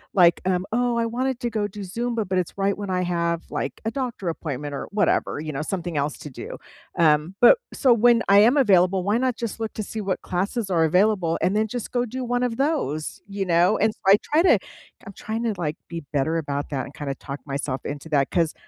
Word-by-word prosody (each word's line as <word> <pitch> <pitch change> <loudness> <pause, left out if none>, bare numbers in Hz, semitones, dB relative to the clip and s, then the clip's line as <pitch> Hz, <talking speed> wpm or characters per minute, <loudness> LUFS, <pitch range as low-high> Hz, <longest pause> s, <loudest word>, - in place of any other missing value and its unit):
like, 175 -3 +5
um, 185 0 +1
"Oh, 240 +1 +1
I 230 - +1
wanted 250 +2 -2
to 240 - -1
go 215 -2 -1
do 205 +1 -9
Zumba," 230 +3 -3
but 185 0 0
it's 180 - -4
right 195 0 +1
when 200 -1 -5
I 180 -1 0
have, 170 -1 -1
like, - - -2
a 225 - 0
doctor 245 -9 -3
appointment 145 -3 -5
or 140 - -5
whatever, 205 -7 +1
you 155 0 -4
know, 135 - -3
something 175 0 -4
else 145 +1 -1
to 155 - -8
do. - - -8 0.4
Um, 155 +2 +3
but 245 - +8 0.2
so, 255 -3 +4
when 235 0 +4
I 200 0 +7
am 235 +7 +5
available, 190 -6 +4
why 205 +4 +1
not 255 -1 0
just 230 -1 -4
look 225 -1 -3
to 215 - -4
see 220 +2 -5
what 190 -2 -2
classes 195 +4 -2
are 165 -2 +3
available 180 0 +2
and 190 - +1
then 215 +1 +2
just 240 +1 -5
go 245 -1 0
do 255 +2 -5
one 245 0 -1
of 235 -2 -1
those? 270 - -1
You 200 -1 -3
know? 180 +4 +3
And 215 +1 +2
so, - - -33
I 195 +1 +8
try 310 +2 +2
to 370 - +6 0.5
I'm 195 - -8
trying 220 +4 -4
to, 230 -2 0
like, 155 -3 -2
be 170 -2 -6
better 145 +3 +1
about 145 -2 -3
that 135 -3 -2
and 140 - -12
kinda 140 -2 -4
talk 140 0 -7
myself 140 -2 -3
into 145 +2 -6
that 140 -3 +1
'cause 165 -3 +1
195 Hz, 240 wpm, -24 LUFS, 160-230 Hz, 0.5 s, but